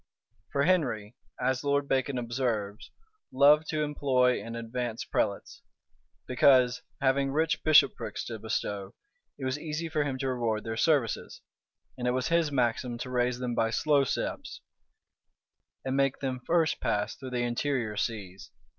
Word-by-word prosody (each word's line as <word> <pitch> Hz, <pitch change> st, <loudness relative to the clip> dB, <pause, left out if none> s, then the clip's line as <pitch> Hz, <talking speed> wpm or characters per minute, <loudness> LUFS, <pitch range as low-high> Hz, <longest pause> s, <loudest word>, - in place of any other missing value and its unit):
For 140 Hz, -, +1 dB
Henry, 125 Hz, -, 0 dB, 0.2 s
as 130 Hz, +1 st, 0 dB
Lord 140 Hz, 0 st, +1 dB
Bacon 135 Hz, 0 st, 0 dB
observes, 115 Hz, -4 st, -2 dB, 0.4 s
loved 145 Hz, +3 st, +5 dB
to 155 Hz, -1 st, 0 dB
employ 130 Hz, -4 st, +1 dB
and 115 Hz, 0 st, -6 dB
advance 115 Hz, 0 st, -4 dB
prelates; -, -, -2 dB, 0.6 s
because, 125 Hz, -1 st, +4 dB, 0.2 s
having 135 Hz, 0 st, +2 dB
rich 160 Hz, +2 st, 0 dB
bishoprics 155 Hz, -1 st, +3 dB
to -, -, -6 dB
bestow, 100 Hz, -2 st, -3 dB, 0.4 s
it 135 Hz, -, -5 dB
was 130 Hz, +2 st, -1 dB
easy 160 Hz, +1 st, -4 dB
for 155 Hz, -2 st, 0 dB
him 135 Hz, -2 st, -3 dB
to 135 Hz, 0 st, -2 dB
reward 115 Hz, -4 st, -1 dB
their 115 Hz, -1 st, -4 dB
services: 135 Hz, -3 st, 0 dB, 0.6 s
and 125 Hz, -, -1 dB
it 125 Hz, -, +2 dB
was 130 Hz, +3 st, -1 dB
his 165 Hz, -3 st, +2 dB
maxim 120 Hz, -2 st, 0 dB
to 125 Hz, +1 st, -6 dB
raise 125 Hz, 0 st, +1 dB
them 125 Hz, -1 st, -3 dB
by 115 Hz, -1 st, +1 dB
slow 145 Hz, +4 st, +2 dB
steps, 135 Hz, -, -4 dB, 1.2 s
and 130 Hz, 0 st, -1 dB
make 135 Hz, -1 st, +2 dB
them 130 Hz, -2 st, -3 dB
first 165 Hz, -2 st, +2 dB
pass 105 Hz, 0 st, 0 dB
through 130 Hz, 0 st, -8 dB
the 125 Hz, -1 st, -1 dB
interior 120 Hz, -2 st, -1 dB
sees. 100 Hz, -4 st, -4 dB
130 Hz, 150 wpm, -29 LUFS, 120-145 Hz, 1.2 s, loved